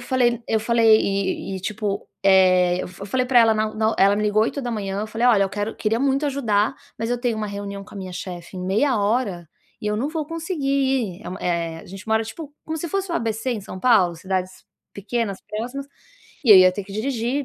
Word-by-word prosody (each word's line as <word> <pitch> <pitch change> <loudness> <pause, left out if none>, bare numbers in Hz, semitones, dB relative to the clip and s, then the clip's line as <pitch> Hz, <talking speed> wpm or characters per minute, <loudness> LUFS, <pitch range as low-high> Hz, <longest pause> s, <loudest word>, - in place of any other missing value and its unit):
falei 245 -1 +1
eu 220 - +2
falei 225 -1 +4
e 195 -1 -1
e, - - -7
tipo, 205 +1 -3
eh, 185 -2 +5
eu - - -1
eu - - -6
f 190 +2 -10
falei 255 +4 0
pra 250 -1 +4
ela 225 -1 +5
na 215 0 -1
na 220 0 +1
ela 200 +1 +5
me 210 - -1
ligou 210 0 +3
8h,, 220 -6 -2
eu 215 - -3
falei: 225 +3 0
"Olha, 215 -5 +5
eu - - -2
quero 205 +2 -3
queria 225 +1 0
muito 275 +2 +1
ajudar, 235 -5 +1 0.2
mas 225 - -2
eu 245 0 0
tenho 240 -3 0
uma 215 -1 -2
reunião 200 0 -6
com - - -15
a - - -8
minha 185 -1 -6
chefe 180 0 -7
em 180 - -5
meia 225 +6 +2
hora 200 -5 -1 0.3
e 210 - -5
eu 210 0 0
não 265 +7 -1
vou 310 -2 -3
conseguir 330 -2 -4
ir". 265 -9 0
Eh - - -6
uma 185 - -6
eh, 170 -2 -2
a - - -15
gente 195 +3 -10
mora 220 0 +2
tipo 290 +6 -8
como 320 - -4
se 335 +2 -4
fosse 390 +1 -2
o - - -1
ABC 225 -2 -1
em 220 - -4
São 190 -1 -8
Paulo, 205 -9 +4
cidades 185 +1 -4 0.3
pequenas, 200 0 -3
próximas, 245 +6 -5 0.6
e 235 - +4
aí - - +10
eu - - +9
ia 185 - +5
ter 205 - -4
que 195 - -11
dirigir 245 +4 -1
215 Hz, 240 wpm, -22 LUFS, 195-250 Hz, 0.6 s, aí